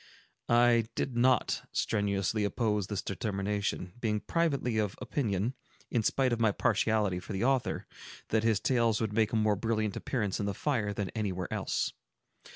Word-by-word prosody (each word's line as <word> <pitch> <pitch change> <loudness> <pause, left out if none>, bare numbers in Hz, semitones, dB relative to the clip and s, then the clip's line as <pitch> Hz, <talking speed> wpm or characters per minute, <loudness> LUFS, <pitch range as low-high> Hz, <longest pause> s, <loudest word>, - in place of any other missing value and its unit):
I 120 -1 +5
did 125 - -2
not 125 -1 +3
very - - -23
strenuously 100 0 0
oppose 105 -2 0
this 100 -4 -3
determination, 100 -2 -2
being 105 -3 0
privately 140 -9 0
of 105 -2 -1
opinion, 115 - -1 0.4
in 120 - +2
spite 130 +3 +2
of 115 - -1
my 110 -2 +4
partiality 105 -3 +1
for 100 - -7
the 95 - -1
author, 130 -1 +1 0.4
that 110 - +2
his 110 -2 +2
tales 115 -4 +2
would 110 -2 -1
make 110 0 +2
a - - -1
more 110 -1 +3
brilliant 110 -1 -1
appearance 105 -7 -2
in 100 - -1
the 100 - -2
fire 115 -7 0
than 100 -2 -3
anywhere 95 -5 -3
else. - - -1
110 Hz, 165 wpm, -30 LUFS, 100-120 Hz, 0.4 s, I